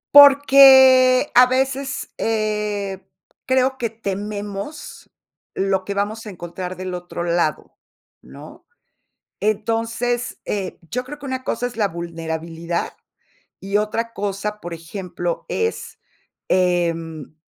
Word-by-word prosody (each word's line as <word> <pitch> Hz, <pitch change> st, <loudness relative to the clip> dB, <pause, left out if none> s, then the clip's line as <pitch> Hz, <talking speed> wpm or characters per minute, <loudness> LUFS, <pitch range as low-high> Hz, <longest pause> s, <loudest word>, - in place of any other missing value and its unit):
Porque 270 Hz, -2 st, +8 dB
a 250 Hz, +1 st, +9 dB
veces, 265 Hz, +1 st, -1 dB
eh, 210 Hz, -3 st, -2 dB, 0.4 s
creo 260 Hz, 0 st, +2 dB
que 235 Hz, -3 st, -2 dB
tememos 205 Hz, +5 st, -6 dB, 0.5 s
lo 190 Hz, -1 st, 0 dB
que 200 Hz, -, -4 dB
vamos 210 Hz, +3 st, -3 dB
a 210 Hz, -, -6 dB
encontrar 180 Hz, 0 st, -7 dB
del 185 Hz, 0 st, -5 dB
otro 175 Hz, -1 st, -5 dB
lado, 170 Hz, -3 st, -1 dB, 0.5 s
¿no? -, -, -13 dB, 0.7 s
Entonces, 230 Hz, +3 st, -1 dB
eh, 195 Hz, -3 st, -4 dB
yo 250 Hz, +3 st, -2 dB
creo 295 Hz, +3 st, -9 dB
que 280 Hz, -, -8 dB
una 260 Hz, -1 st, -4 dB
cosa 245 Hz, +2 st, -2 dB
es 240 Hz, -, -11 dB
la 210 Hz, -3 st, +2 dB
vulnerabilidad 165 Hz, 0 st, -4 dB, 0.7 s
y 195 Hz, +1 st, -1 dB
otra 230 Hz, +2 st, -2 dB
cosa, 205 Hz, +1 st, -3 dB
por 175 Hz, 0 st, -6 dB
ejemplo, 175 Hz, +1 st, -5 dB
es, 450 Hz, 0 st, -3 dB, 0.5 s
em, 165 Hz, -4 st, 0 dB
205 Hz, 115 wpm, -21 LUFS, 180-250 Hz, 0.7 s, a